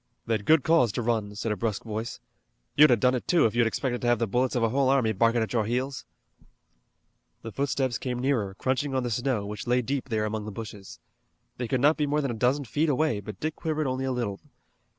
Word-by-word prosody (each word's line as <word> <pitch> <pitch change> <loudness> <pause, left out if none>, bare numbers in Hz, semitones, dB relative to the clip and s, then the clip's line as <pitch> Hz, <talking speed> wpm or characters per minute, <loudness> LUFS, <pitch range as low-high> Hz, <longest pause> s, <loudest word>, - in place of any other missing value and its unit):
"They'd 110 -3 -1
good 160 -3 +5
cause 160 -9 +4
to 120 - -2
run," 110 -3 -1
said 110 +2 -2
a - - 0
brusque 105 0 -2
voice. 110 +1 -5 0.6
"You'd 150 +1 +7
a 120 - +6
done 125 +3 +2
it, 125 - -3
too, 175 - +4
if 110 - +1
you'd 120 -1 +3
expected 125 +1 -2
to 120 - -1
have 120 0 +4
the 115 - 0
bullets 125 +5 0
of 120 - +1
a 115 - +3
whole 135 +2 +2
army 130 -5 +3
barkin' 115 +2 +2
at 110 - -5
your 110 -3 +1
heels." 130 +3 -2 1.4
The 115 - -6
footsteps 135 -1 -1
came 125 -2 -3
nearer, 120 -7 0
crunching 130 +4 -1
on 130 - +1
the 120 - -2
snow, 120 -2 -1
which 105 +3 -6
lay 125 +1 +2
deep 135 +2 -3
there 110 -2 0
among 110 0 -3
the 110 - -5
bushes. 105 -2 -9 0.6
They 120 - -3
could 130 +1 0
not 150 +3 +4
be 150 -2 0
more 150 +1 +1
than 135 -3 -1
a - - -3
dozen 125 +5 +1
feet 150 +7 0
away, 145 -5 +1
but 100 -1 -9
Dick 155 0 -2
quivered 155 -2 -2
only 130 0 -1
a 130 - -1
little. 115 -6 -2
120 Hz, 240 wpm, -27 LUFS, 110-135 Hz, 1.4 s, You'd